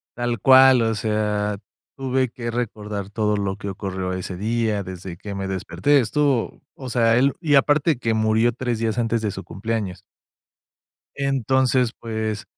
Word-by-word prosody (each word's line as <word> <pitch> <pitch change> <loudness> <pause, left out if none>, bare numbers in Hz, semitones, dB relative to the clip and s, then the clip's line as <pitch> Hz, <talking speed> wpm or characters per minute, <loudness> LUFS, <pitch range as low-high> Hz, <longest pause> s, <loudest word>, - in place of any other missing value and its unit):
tal 120 -2 -2
cual. 130 0 +7
O 115 -1 +1
sea, 105 -1 -1 0.4
tuve 130 -1 0
que 115 0 -6
recordar 105 -4 -4
todo 105 0 0
lo 100 -1 -2
que 100 - -5
ocurrió 95 -1 -4
ese 90 0 -5
día, 110 -1 -1
desde 90 -1 -8
que 100 0 -7
me 95 0 -3
desperté, 95 - +1
estuvo 135 +1 0
O 130 -2 -8
sea, 115 -1 +3
él 135 +2 +3
Y 150 -3 +3
aparte 145 +2 +3
que 115 -2 -1
murió 110 +2 +2
3 120 -2 -2
días 115 0 -1
antes 115 -1 0
de 105 -2 -1
su 95 - -7
cumpleaños. 100 -3 -4 1.1
Entonces 130 -2 +1
pues, 110 -2 -3
115 Hz, 155 wpm, -22 LUFS, 100-125 Hz, 1.1 s, cual